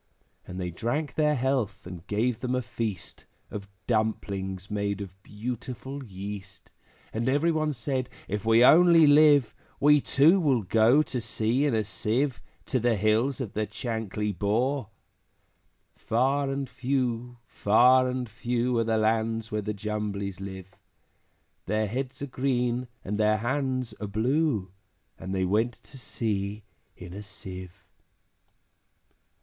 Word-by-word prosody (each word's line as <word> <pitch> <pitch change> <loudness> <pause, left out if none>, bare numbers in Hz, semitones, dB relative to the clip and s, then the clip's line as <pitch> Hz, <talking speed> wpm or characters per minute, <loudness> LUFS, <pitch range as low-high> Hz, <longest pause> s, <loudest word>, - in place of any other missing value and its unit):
And 90 - -6
they 90 -1 -3
drank 120 - -2
their 150 -1 +2
health, 130 -6 -1
and 90 0 -9
gave 110 +3 0
them 130 0 -1
a 130 - -1
feast 110 -5 -5 0.3
Of 100 -1 -7 0.2
dumplings 100 -4 -2
made 100 -1 -1
of 95 -1 -9
beautiful 125 +6 -6
yeast; 100 -2 -8 0.4
And 115 +3 0
every 145 +5 +2
one 155 -1 0
said, 130 +1 -2 0.2
`If 105 +1 -3
we 115 +2 +5
only 170 +1 +7
live, 145 -5 +6 0.3
We 150 0 +5
too 160 +10 +4
will 135 - +2
go 115 +9 +4
to 125 -5 -4
sea 115 +5 0
in 140 -6 +1
a 110 - +1
Sieve, 120 +5 -1 0.2
To 130 - 0
the 120 0 +2
hills 110 +7 +1
of 120 -7 -4
the 110 0 -1
Chankly 110 -2 -3
Bore!' 115 - 0 1.1
Far 135 +4 +1
and 135 0 -2
few, 125 -2 -2
far 125 +5 +4
and 125 -1 -2
few, 120 +2 -1
Are - - +3
the 110 0 +1
lands 110 +1 0
where 105 0 -1
the 105 +1 -3
Jumblies 100 -2 -4
live; 95 -1 -8 0.9
Their 110 +2 +1
heads 130 +6 -4
are - - 0
green, 125 -2 -1 0.2
and 105 +2 -3
their 110 0 +3
hands 130 +1 -1
are 105 - -3
blue, 110 - 0 0.5
And 95 - -6
they 95 -1 0
went 110 +6 +1
to 135 - -12
sea 105 -3 -3 0.3
in 90 0 -10
a 100 - -7
Sieve. 95 -2 -9
115 Hz, 145 wpm, -27 LUFS, 105-130 Hz, 1.1 s, only